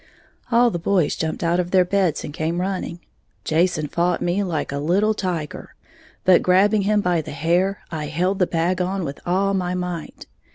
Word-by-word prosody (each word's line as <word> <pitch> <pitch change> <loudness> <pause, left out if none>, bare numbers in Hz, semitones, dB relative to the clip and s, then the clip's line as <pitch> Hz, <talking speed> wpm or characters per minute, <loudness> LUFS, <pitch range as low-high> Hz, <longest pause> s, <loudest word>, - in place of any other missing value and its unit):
All 235 0 +4
the 175 - -3
boys 180 -2 +1
jumped 160 +1 -3
out 170 +1 +2
of 175 -1 -1
their 185 -1 +4
beds 185 -4 0
and 145 - -7
came 165 +2 -2
running. 180 -2 -3 0.4
Jason 160 -1 +1
fought 170 +4 0
me 175 +3 0
like 170 -8 -2
a 140 - -3
little 195 +8 +2
tiger; 175 -7 -4 0.5
but 185 -1 +5
grabbing 200 +3 +3
him 205 +1 +2
by 175 -3 +1
the - - -10
hair, 175 +7 0
I 155 -2 -4
held 180 +6 -1
the 180 - +3
bag 175 +2 0
on 185 0 -1
with 140 -1 -6
all 195 +3 +1
my 180 -2 -1
might. 180 -3 -5
180 Hz, 190 wpm, -22 LUFS, 165-190 Hz, 0.5 s, but